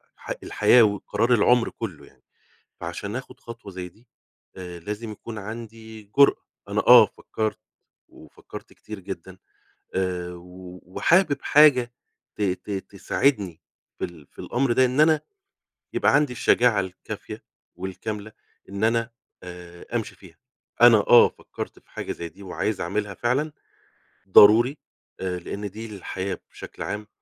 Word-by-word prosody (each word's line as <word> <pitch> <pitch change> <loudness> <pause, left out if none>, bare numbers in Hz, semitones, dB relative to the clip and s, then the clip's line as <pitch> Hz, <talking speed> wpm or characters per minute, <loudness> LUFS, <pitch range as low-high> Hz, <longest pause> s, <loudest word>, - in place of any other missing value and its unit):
ح - - -14
الحياة 120 -2 +5
وقرار 105 +3 +1
العُمر 120 +2 +4
كلّه 100 -9 -7
يعني. - - -23 0.6
فعشان 100 +6 -5
آخد 130 0 -8
خطوة 115 -4 -10
زي 90 -1 -6
دي 110 +8 -22 0.5
آآ 90 -2 -8
لازم 105 +4 -6
يكون 110 +1 -9
عندي 110 +1 -9
جرأة. 140 - +5 0.2
أنا - - +1
آه، - - +10
فكرت 110 -1 -4 0.5
وفكرت - - -13
كتير 110 -2 -10
جدًا، 95 0 -8 0.6
آآ 90 -2 -2
و 90 +1 -12
وحابب 160 - +2
حاجة 130 -5 +5 0.4
ت 105 - -4
ت 95 +1 -2
تساعدني 100 - -1 0.4
في - - -2
ال 85 -5 -9
في - - -32
الأمر 125 0 0
ده، 130 - +4
إن 130 +3 +1
أنا 155 0 +5 0.7
يبقى - - +2
عندي 145 -3 +3
الشجاعة 120 -3 +3
الكافية 95 -1 -7 0.3
والكاملة 105 +3 -6 0.4
إن 100 +2 -3
أنا 115 +1 +1 0.3
آآ 90 -1 -11
أمشي 110 - -3
فيها. 85 -4 -17 0.5
أنا 120 -2 +9
آه، 120 +3 +7
فكرت - - -9
في - - -29
حاجة - - -5
زي 85 - -7
دي، 100 +3 -16
وعايز 95 +2 -3
أعملها 100 +3 -2
فعلًا 130 - -1 0.8
ضروري، 115 +9 +7 0.4
آآ 90 -1 -3
لأن 100 +4 -6
دي 110 +4 -8
الحياة 95 +1 -4
بشكل - - -9
عام، 105 0 -5
105 Hz, 140 wpm, -24 LUFS, 95-120 Hz, 0.8 s, آه